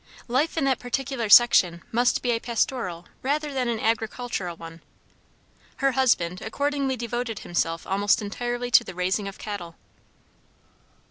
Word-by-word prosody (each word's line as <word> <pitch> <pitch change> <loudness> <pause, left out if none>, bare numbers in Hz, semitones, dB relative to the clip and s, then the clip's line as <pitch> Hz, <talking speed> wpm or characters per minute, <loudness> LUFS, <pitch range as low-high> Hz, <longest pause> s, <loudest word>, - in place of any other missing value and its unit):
Life 275 +8 0
in 320 - +1
that 270 -1 +1
particular 245 -2 -3
section 180 -6 +6
must 245 +2 +2
be 245 - +1
a 230 - 0
pastoral 230 -7 -2 0.2
rather 295 +2 -1
than 255 -2 -1
an 230 -2 -1
agricultural 220 -4 -2
one: 165 0 -11 0.9
her 275 0 +1
husband 185 -10 +1
accordingly 280 +3 -1
devoted 235 -1 -4
himself 165 -1 -2
almost 200 +2 +2
entirely 240 +4 -4
to - - +7
the - - -9
raising 185 +3 -1
of 195 - -8
cattle. 175 -6 -6
235 Hz, 140 wpm, -25 LUFS, 190-255 Hz, 0.9 s, to